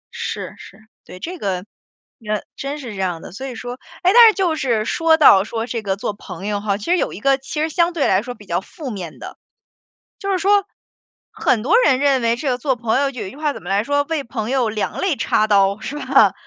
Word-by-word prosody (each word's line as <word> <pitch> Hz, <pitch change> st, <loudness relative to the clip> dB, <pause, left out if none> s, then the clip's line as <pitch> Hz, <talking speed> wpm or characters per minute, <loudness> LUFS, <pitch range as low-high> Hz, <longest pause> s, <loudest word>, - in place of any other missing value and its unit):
是， -, -, -4 dB
是， -, -, -13 dB, 0.3 s
对， 185 Hz, -, -11 dB
这 355 Hz, -, -6 dB
个， 185 Hz, -2 st, -2 dB, 0.6 s
呃， 215 Hz, -1 st, -1 dB
真 275 Hz, +2 st, -4 dB
是 250 Hz, -7 st, -7 dB
这 195 Hz, -, -5 dB
样 180 Hz, -3 st, -1 dB
的， -, -, -9 dB
所 265 Hz, +9 st, -7 dB
以 250 Hz, -, -7 dB
说 245 Hz, +2 st, -7 dB, 0.2 s
哎， 365 Hz, -, +5 dB
但 475 Hz, 0 st, +10 dB
是 435 Hz, -, 0 dB
就 360 Hz, -5 st, +1 dB
是 235 Hz, -7 st, 0 dB
说 325 Hz, +5 st, +3 dB
到 200 Hz, -11 st, +7 dB
说 225 Hz, +1 st, -4 dB
这 235 Hz, -1 st, -4 dB
个 195 Hz, -2 st, -1 dB
做 205 Hz, +1 st, -3 dB
朋 200 Hz, -1 st, -9 dB
友 205 Hz, -1 st, -2 dB
哈， 200 Hz, -2 st, 0 dB
其 205 Hz, -, -9 dB
实 360 Hz, +1 st, +2 dB
有 -, -, -1 dB
一 -, -, -8 dB
个 270 Hz, +4 st, +3 dB
其 270 Hz, +3 st, -5 dB
实 315 Hz, -, +1 dB
相 340 Hz, +2 st, +2 dB
对 320 Hz, -4 st, +1 dB
来 190 Hz, +1 st, +3 dB
说 245 Hz, +1 st, -7 dB
比 205 Hz, -, -15 dB
较 175 Hz, 0 st, -1 dB
负 285 Hz, -, -8 dB
面 180 Hz, -7 st, -7 dB
的。 -, -, -9 dB, 0.8 s
就 395 Hz, -1 st, -2 dB
是 375 Hz, -, +1 dB
说， 400 Hz, +2 st, +3 dB, 0.7 s
很 225 Hz, -4 st, +1 dB
多 350 Hz, -, +3 dB
人 260 Hz, -1 st, +3 dB
认 275 Hz, -2 st, +3 dB
为 230 Hz, 0 st, +2 dB
这 265 Hz, +3 st, -2 dB
个 250 Hz, -, -1 dB
做 265 Hz, +1 st, 0 dB
朋 235 Hz, +1 st, 0 dB
友 275 Hz, -1 st, +1 dB
就 250 Hz, -, -7 dB
有 200 Hz, -, -4 dB
一 -, -, -8 dB
句 270 Hz, -, -13 dB
话 300 Hz, -1 st, -1 dB
怎 -, -, -10 dB
么 180 Hz, -, -7 dB
来 200 Hz, +2 st, +2 dB
说： 285 Hz, +1 st, +1 dB
“为 310 Hz, -4 st, -1 dB
朋 230 Hz, -1 st, -4 dB
友 260 Hz, -3 st, +1 dB
两 215 Hz, -1 st, -3 dB
肋 385 Hz, -5 st, +1 dB
插 215 Hz, -5 st, +1 dB
刀”， 200 Hz, -1 st, +3 dB
是 275 Hz, +6 st, -6 dB
吧？ -, -, +4 dB
245 Hz, 275 characters per minute, -20 LUFS, 210-295 Hz, 0.8 s, 但